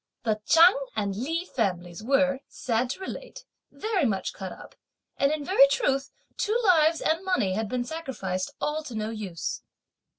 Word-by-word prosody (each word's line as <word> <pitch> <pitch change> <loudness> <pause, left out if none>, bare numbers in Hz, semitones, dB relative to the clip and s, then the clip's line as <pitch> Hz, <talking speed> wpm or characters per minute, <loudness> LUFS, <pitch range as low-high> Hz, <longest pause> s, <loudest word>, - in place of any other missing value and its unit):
The 215 -2 0
Chang 340 +6 +7 0.2
and 200 -2 -1
Li 325 - -2
families 180 - -2
were, 275 +3 +2
sad 240 0 -1
to 260 - -4
relate, - - -8 0.2
very 425 -5 -1
much 195 -5 -1
cut 190 -1 -6
up, - - -12 0.4
and, 280 +1 +3
in 305 -2 -2
very 325 -6 +6
truth, 275 0 0 0.3
two 435 +3 +1
lives 325 -4 +4
and 325 +4 +1
money 365 - +1
had 215 +1 -2
been 250 +1 -1
sacrificed 240 - -4
all 300 +1 -1
to 245 - -7
no 215 0 -2
use. 180 -10 -4
270 Hz, 165 wpm, -27 LUFS, 210-325 Hz, 0.4 s, Chang